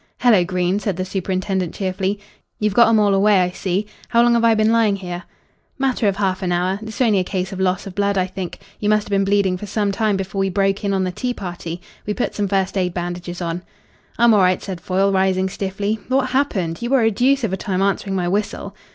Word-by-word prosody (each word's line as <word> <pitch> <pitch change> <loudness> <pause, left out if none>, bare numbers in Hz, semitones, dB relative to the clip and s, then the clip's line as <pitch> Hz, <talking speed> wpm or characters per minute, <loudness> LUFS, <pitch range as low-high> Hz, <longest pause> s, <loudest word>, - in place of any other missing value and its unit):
"Hello, 225 -7 +5
Green," 180 +2 0
said 200 -3 -2
the 185 - -2
superintendent 185 -1 -2
cheerfully. 190 +1 -2 0.4
"You've 210 -1 0
got 235 +2 +6
'em 225 -1 +4
all 205 -1 +3
away, 200 0 +4
I 180 0 +1
see. 190 +2 -2 0.2
How 235 -1 +4
long 240 0 +4
have 235 0 +2
I 230 -1 +5
been 215 +1 +3
lying 225 -3 +3
here?" 180 -2 -6 0.5
"Matter 260 -5 +1
of 195 - +1
half 190 -2 -1
an 180 -2 -1
hour. 180 +3 0
It's 220 +1 -6
only 215 -6 +4
a - - +1
case 185 0 -3
of 190 - -6
loss 185 0 0
of 195 - -7
blood, 200 +1 0
I 185 - +2
think. 185 -1 -6 0.2
You 210 - 0
must 215 0 +3
have - - -11
been 195 0 +2
bleeding 195 -2 +2
for 210 - -7
some 205 0 0
time 210 0 +1
before 195 +1 -4
we 195 0 +1
broke 195 +1 0
in 200 - 0
on 190 - +1
the 185 - -1
tea 245 +6 -3
party. 175 -2 -6 0.3
We 210 - -1
put 250 - -2
some 205 -1 -1
first 195 0 0
aid 180 -1 -1
bandages 175 0 -4
on." 170 +1 -3 0.6
"I'm 235 0 +5
all 210 - +5
right," 185 -1 +2
said 185 -4 -6
Foyle, 190 +2 +1
rising 190 0 +1
stiffly. 200 +3 -2
"What 260 0 +1
happened? 195 -11 0
You 240 - -2
were 265 -1 +4
a 225 - +3
deuce 265 +5 +2
of 210 -4 -1
a - - +2
time 190 -1 -1
answering 195 0 0
my 180 -2 0
whistle." 200 +1 -2
195 Hz, 245 wpm, -20 LUFS, 185-210 Hz, 0.6 s, got